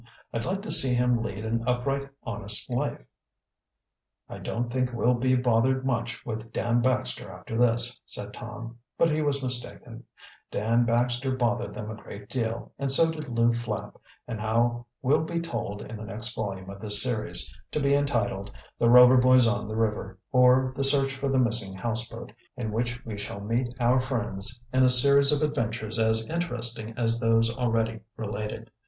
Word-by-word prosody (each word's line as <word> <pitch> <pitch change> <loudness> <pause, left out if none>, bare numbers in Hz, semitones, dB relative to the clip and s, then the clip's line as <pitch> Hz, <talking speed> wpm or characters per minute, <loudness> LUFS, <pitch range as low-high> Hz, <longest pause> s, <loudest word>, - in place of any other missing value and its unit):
"I'd 115 - -3
like 195 +2 -3
to 215 - -4
see 130 -2 +4
him 125 -1 +1
lead 105 -1 -5
an 115 +1 -2
upright, 135 +3 -1
honest 105 -2 -4
life." 135 +4 -3 1.2
"I - - -9
don't 120 +1 -3
think 130 -1 0
we'll 120 +1 +1
be 130 +1 +1
bothered 125 +2 +1
much 120 -2 -3
with 110 -1 -6
Dan 120 +1 0
Baxter 130 -5 0
after 90 +4 -8
this," 120 0 +2
said - - -3
Tom, 115 +1 -9 0.2
but 165 - +3
he 155 +1 0
was 140 -2 -1
mistaken, 125 -1 -2 0.5
Dan 115 +3 +1
Baxter 120 +2 0
bothered 120 -2 -1
them 105 +1 -6
a - - -7
great 100 +1 -11
deal, 115 -2 -3
and 140 -1 -1
so 160 +5 +4
did 155 -3 -8
Lew 115 0 +2
Flapp, 115 -3 -5 0.3
and 115 -3 -5
how 120 +2 0 0.2
will 140 +4 +3
be 170 +1 -3
told 165 -11 -5
in 115 - -8
the 110 - -8
next 110 +5 -4
volume 95 -3 -5
of 100 - -11
this 105 -1 +6
series, 120 -4 0 0.2
to - - -2
be 140 -1 +1
entitled, 120 -8 -1 0.3
"The 115 - +3
Rover 125 +1 +8
Boys 130 0 +5
on 115 -3 -1
the 110 - -5
River; 105 -3 -2
Or, 130 0 +4
The 135 - -2
Search 135 0 +7
for 135 0 -3
the 135 - +1
Missing 115 -6 +2
Houseboat," 115 +1 -2 0.3
in 110 -4 -4
which 120 +3 -3
we 105 -3 -6
shall 105 -1 -6
meet 115 +5 -2
our 120 0 +3
old 130 -1 +1
friends 120 -3 -3
in 130 - +3
a 130 - +5
series 140 +3 +7
of 150 +1 0
adventures 115 -5 -2
as 110 0 +1
interesting 120 -8 -1
as 115 -1 +2
those 115 0 +2
already 115 -3 -1 0.2
related. 105 -1 -6
120 Hz, 180 wpm, -26 LUFS, 110-130 Hz, 1.2 s, Rover